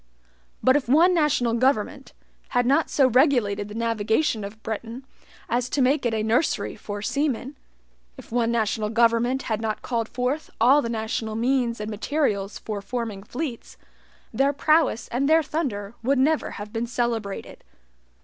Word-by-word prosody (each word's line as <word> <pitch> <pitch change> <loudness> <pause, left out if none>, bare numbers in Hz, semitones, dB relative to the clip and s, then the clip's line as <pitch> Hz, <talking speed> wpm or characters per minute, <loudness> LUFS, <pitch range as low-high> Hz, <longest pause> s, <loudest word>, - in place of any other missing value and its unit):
But 260 - +5
if 280 -4 0
one 335 +7 +5
national 300 -8 +2
government, 260 +2 0 0.4
had 245 -1 +1
not 280 +6 +2
so 270 -3 +4
regulated 240 -6 +2
the 210 - -9
navigation 225 +2 0
of 210 +2 -9
Britain 230 +4 -5 0.4
as 245 +2 -1
to 285 - -1
make 270 0 +2
it 230 - -2
a 215 - -1
nursery 230 +8 0
for 205 0 -6
seamen 280 +1 -1 0.6
if - - -13
one 235 -1 +1
national 220 -2 0
government 235 +3 +2
had 220 -2 -2
not 220 -1 -3
called 230 -2 -2
forth 255 +5 -2
all 260 +6 +6
the 230 - -3
national 220 0 -3
means 240 0 0
and 210 +1 -4
materials 210 -3 -1
for 210 -2 -5
forming 220 -1 -4
fleets, 245 +3 -6 0.6
their 275 +1 +2
prowess 310 -3 +2
and 275 +4 0
their 320 0 +5
thunder 230 -11 -3
would 270 +4 +1
never 295 +4 +2
have 205 +1 -8
been 230 +1 -2
celebrated. 230 -4 -3
235 Hz, 160 wpm, -24 LUFS, 220-270 Hz, 0.6 s, all